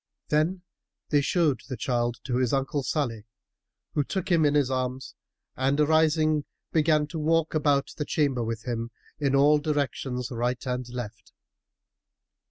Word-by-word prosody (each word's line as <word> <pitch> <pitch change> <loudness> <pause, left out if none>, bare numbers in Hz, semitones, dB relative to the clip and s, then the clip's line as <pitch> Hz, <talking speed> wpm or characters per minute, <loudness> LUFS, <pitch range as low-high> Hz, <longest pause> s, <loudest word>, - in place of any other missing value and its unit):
Then 165 +5 +1 0.5
they 145 -2 +4
showed 150 -3 +1
the 130 - -4
child 120 +1 0
to 125 -2 -1
his 130 -1 +1
uncle 135 +1 0
Salih, 120 -7 -2 0.7
who 145 - +2
took 190 +5 -3
him 165 -3 +4
in 145 0 +3
his 140 -3 +2
arms 130 0 -2 0.4
and 135 +2 +1
arising 155 0 +3 0.3
began 155 -1 +3
to 155 +2 -6
walk 160 +1 +1
about 145 -3 +1
the 150 - -1
chamber 140 -6 +1
with 115 0 -4
him 115 -2 -3 0.3
in 140 -2 +1
all 145 +2 +5
directions 135 -4 -2
right 125 +2 -2
and 125 -1 -3
left. 120 -3 -7
140 Hz, 150 wpm, -27 LUFS, 125-155 Hz, 0.7 s, all